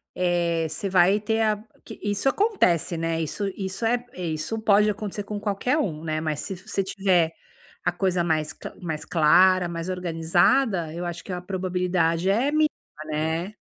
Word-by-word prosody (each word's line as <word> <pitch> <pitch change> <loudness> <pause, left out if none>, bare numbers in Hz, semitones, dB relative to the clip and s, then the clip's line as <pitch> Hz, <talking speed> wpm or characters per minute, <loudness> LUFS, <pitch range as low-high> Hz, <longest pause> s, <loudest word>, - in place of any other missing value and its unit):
eh, 170 -2 +1
você 195 +5 -4
vai 185 +2 +4
ter 220 +2 0
a 215 -1 +1 0.2
que - - -10
isso 205 +4 -1
acontece, 270 - +2
né, 165 0 -1
isso 180 +6 -3
isso 190 +3 -4
é 240 +1 +1
isso 165 +4 -3
pode 210 0 +4
acontecer 205 0 -4
com 205 0 -5
qualquer 210 +7 0
um, 165 - -2
né, 155 -1 -1
mas 155 -2 -2
se 195 - -4
fi 185 - -16
se 195 - -1
tiver 185 -4 +2 0.5
a 180 - +2
coisa 180 -1 0
mais 155 -2 0
cla - - -9
mais 160 -3 -4
clara, 180 +3 +5
mais 170 +1 -5
organizada, 175 +3 +1
eu 170 +2 -5
acho 170 -1 -5
que 190 - -8
a 180 - -3
probabilidade 180 -2 0
é 255 +8 +2
miníma, 310 0 +3 0.4
né. 160 +6 -2
180 Hz, 175 wpm, -25 LUFS, 165-205 Hz, 0.5 s, clara